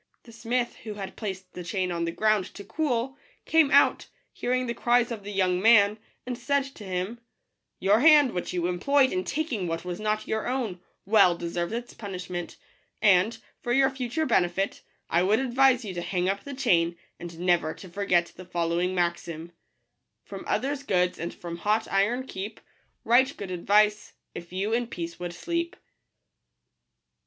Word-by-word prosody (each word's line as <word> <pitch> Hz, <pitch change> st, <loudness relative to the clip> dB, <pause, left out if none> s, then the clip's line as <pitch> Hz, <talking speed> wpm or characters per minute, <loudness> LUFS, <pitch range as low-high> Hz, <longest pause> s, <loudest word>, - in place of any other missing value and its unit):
The 235 Hz, -, -14 dB
smith, 235 Hz, +2 st, -2 dB
who 215 Hz, -2 st, -8 dB
had 195 Hz, -2 st, -7 dB
placed 190 Hz, -4 st, -6 dB
the 180 Hz, -, -7 dB
chain 180 Hz, +1 st, -2 dB
on 170 Hz, -1 st, -1 dB
the 165 Hz, -, -2 dB
ground 215 Hz, +1 st, +2 dB
to 200 Hz, -, -8 dB
cool, 265 Hz, -1 st, -2 dB, 0.3 s
came 320 Hz, -3 st, +4 dB
out, 280 Hz, +1 st, +4 dB, 0.3 s
hearing 255 Hz, +1 st, -1 dB
the 235 Hz, -, -2 dB
cries 240 Hz, 0 st, +2 dB
of 220 Hz, -3 st, -5 dB
the 205 Hz, -, -6 dB
young 185 Hz, -2 st, +1 dB
man, 210 Hz, -1 st, +5 dB, 0.3 s
and 250 Hz, 0 st, -3 dB
said 280 Hz, +3 st, 0 dB
to 215 Hz, -, -11 dB
him, 190 Hz, +4 st, -3 dB, 0.3 s
" -, -, -55 dB
Your 200 Hz, +3 st, +4 dB
hand, 295 Hz, -2 st, +7 dB
which 180 Hz, -, -3 dB
you 175 Hz, -1 st, -1 dB
employed 260 Hz, +10 st, +2 dB
in 185 Hz, -, 0 dB
taking 265 Hz, -, -2 dB
what 165 Hz, +1 st, -3 dB
was 180 Hz, 0 st, -4 dB
not 215 Hz, 0 st, -1 dB
your 220 Hz, 0 st, -2 dB
own, 240 Hz, -8 st, -2 dB, 0.3 s
well 185 Hz, -4 st, +5 dB
deserves 170 Hz, +1 st, -3 dB
its 240 Hz, +1 st, -5 dB
punish 185 Hz, -4 st, -7 dB
ment; 175 Hz, -1 st, -5 dB, 0.4 s
and, 200 Hz, +2 st, +4 dB, 0.2 s
for 240 Hz, -, -3 dB
your 270 Hz, +2 st, +4 dB
future 265 Hz, +4 st, -2 dB
benefit, 185 Hz, -, +1 dB, 0.3 s
I 170 Hz, -, +2 dB
would 200 Hz, +4 st, +3 dB
advise 260 Hz, -1 st, +3 dB
you 195 Hz, -, -5 dB
to 175 Hz, -, -4 dB
hang 180 Hz, 0 st, -1 dB
up 200 Hz, +1 st, -2 dB
the 280 Hz, -1 st, -6 dB
chain, 170 Hz, -10 st, +2 dB, 0.2 s
and 170 Hz, -1 st, -8 dB
never 175 Hz, -3 st, +2 dB
to 190 Hz, -, -11 dB
forget 175 Hz, -2 st, 0 dB
the 185 Hz, -, -10 dB
following 175 Hz, +1 st, -1 dB
maxim: 170 Hz, -1 st, -2 dB, 0.7 s
From -, -, -8 dB
others' 280 Hz, +1 st, -1 dB
goods 180 Hz, -8 st, 0 dB
and 170 Hz, +1 st, -3 dB
from 170 Hz, -1 st, -7 dB
hot 215 Hz, +5 st, 0 dB
iron 230 Hz, +7 st, +1 dB
keep: 210 Hz, -2 st, -6 dB, 0.4 s
Right 255 Hz, +4 st, +4 dB
good 195 Hz, -2 st, -6 dB
advice, 210 Hz, +4 st, +2 dB, 0.2 s
if 170 Hz, 0 st, -9 dB
yon 195 Hz, +4 st, -1 dB
in 240 Hz, 0 st, 0 dB
peace 170 Hz, -6 st, -6 dB
would 175 Hz, -1 st, -5 dB
sleep. 340 Hz, -, -2 dB
205 Hz, 180 wpm, -27 LUFS, 180-245 Hz, 0.7 s, hand